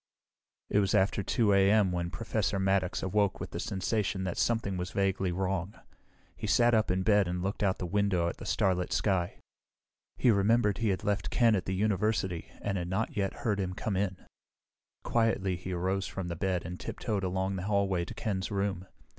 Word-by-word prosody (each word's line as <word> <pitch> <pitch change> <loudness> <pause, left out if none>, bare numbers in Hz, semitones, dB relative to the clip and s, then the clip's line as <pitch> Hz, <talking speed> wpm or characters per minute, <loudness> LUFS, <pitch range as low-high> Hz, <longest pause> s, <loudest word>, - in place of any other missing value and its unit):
It 105 - +4
was 100 -2 +2
after 100 +1 +2
2 105 +1 +2
a.m. 100 0 +4
when 85 -1 -2
Professor 110 0 -1
Maddox 95 -1 +1
awoke 100 +1 +1
with - - -6
the - - -4
sensation 95 0 -1
that 90 -2 -2
something 115 -5 0
was 90 0 -3
vaguely 95 -2 0
wrong. 95 +1 -2 0.6
He - - -5
sat 120 +2 +4
up 110 -1 +3
in 95 +1 +1
bed 105 -2 +4
and 90 0 -2
looked 100 +3 -3
out 95 -2 +2
the 90 - -4
window 95 -2 +1
at - - -4
the - - -8
starlit 90 -2 +1
sky. 90 -1 0 0.8
He 125 - +4
remembered 105 0 +3
he 115 -2 +1
had 95 - -1
left 105 0 -1
Ken 115 -2 +4
at 95 - -2
the 95 - -2
university 100 -3 0
and 100 -2 -1
had 85 - -4
not 95 +5 -2
yet 100 -2 0
heard 105 -3 +1
him 90 -1 -2
come 105 0 -2
in. 95 -1 -1 0.9
Quietly 110 -5 +1
he 90 +2 -6
arose 95 +2 -1
from 95 -3 -5
the 85 - -3
bed 90 0 -1
and 90 +1 -6
tiptoed 105 -4 -3
along 95 +1 -1
the 95 0 -4
hallway 100 -3 +1
to - - -9
Ken's 95 -5 -2
room. 100 -2 -2
95 Hz, 195 wpm, -30 LUFS, 90-105 Hz, 0.9 s, It